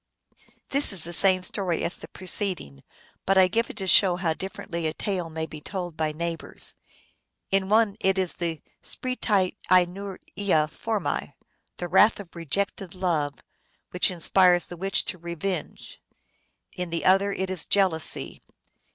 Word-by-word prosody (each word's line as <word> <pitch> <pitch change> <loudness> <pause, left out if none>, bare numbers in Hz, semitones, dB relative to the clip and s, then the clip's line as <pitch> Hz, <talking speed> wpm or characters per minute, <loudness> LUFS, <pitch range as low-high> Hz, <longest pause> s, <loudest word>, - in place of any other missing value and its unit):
This 280 -2 +3
is 185 -5 0
the 170 - -5
same 185 +1 +5
story 185 -4 0
as 175 - 0
the - - -10
preceding, 180 - -2 0.4
but 195 0 +2
I 190 -1 +7
give 230 +5 0
it - - -9
to 195 - +2
show 185 0 +6
how 175 -3 0
differently 170 -2 -5
a 155 - -3
tale 185 -5 -2
may 160 0 -3
be 155 -1 -10
told 175 -1 -5
by 155 -1 -1
neigh 170 +2 -2
bors. - - -1 0.8
In 195 0 +1
one 215 -1 +3
it 190 0 +2
is 185 -2 +2
the 165 -3 -3 0.2
spretce 210 -7 0 0.2
injuria 185 -2 +1
formce, 215 +6 -3 0.4
the 175 - -4
wrath 205 +5 +5
of 180 -4 -11
rejected 185 +3 -3
love, 160 -6 -1 0.5
which 180 - +3
inspires 180 0 +3
the 175 - -9
witch 195 +3 0
to 180 - -5
revenge; 170 +1 -5 0.7
in 180 -1 -4
the 165 0 -3
other 195 +2 +4
it 190 -1 -3
is 185 -4 -1
jealousy. 185 -6 0
185 Hz, 155 wpm, -26 LUFS, 170-195 Hz, 0.8 s, I